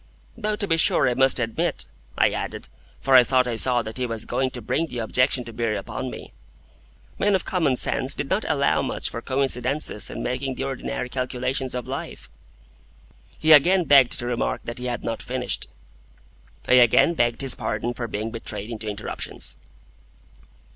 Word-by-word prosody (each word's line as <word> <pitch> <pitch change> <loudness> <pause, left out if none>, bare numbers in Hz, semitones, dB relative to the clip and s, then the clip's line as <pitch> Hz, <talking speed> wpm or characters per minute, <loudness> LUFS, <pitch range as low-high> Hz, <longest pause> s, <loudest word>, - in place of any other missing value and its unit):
Though 215 -2 -2
to 210 - -2
be 165 -2 +2
sure 160 - +3
I 125 - +2
must 135 +1 +4
admit, 115 -2 -1 0.3
I - - +4
added - - -5 0.3
(for 135 - +1
I 130 -1 +9
thought 130 +1 +2
I 120 - -2
saw 120 +2 +3
that 110 +3 -7
he 125 - -1
was 115 -2 -2
going 130 +1 0
to 125 - -8
bring 155 +8 -1
the 125 - -7
objection 125 +3 +1
to 115 0 -10
bear 115 -1 -1
upon 130 +6 -5
me), - - -10 0.9
men 205 -1 +3
of 185 - -1
common 160 -8 +1
sense - - +1
did - - -3
not - - 0
allow - - +2
much - - -1
for 115 - -5
coincidences 130 -2 0
in - - -6
making 130 +1 -2
the 135 - -4
ordinary 135 -2 -4
calculations 130 +1 -2
of 125 - -4
life. - - -7 1.1
He 155 - +2
again 180 +5 +6
begged 140 -5 +5
to 120 - -4
remark 120 -1 -1
that 120 +2 -7
he 125 - -6
had 120 -1 -3
not 115 - -3
finished. 125 0 -2 1.0
I - - +3
again 120 +8 +5
begged 120 -6 0
his 135 -1 +1
pardon 110 0 -3
for 120 -1 -4
being 110 +1 -4
betrayed 115 -1 -6
into 110 -1 -6
interruptions. 80 -10 -4
125 Hz, 180 wpm, -24 LUFS, 115-135 Hz, 1.1 s, I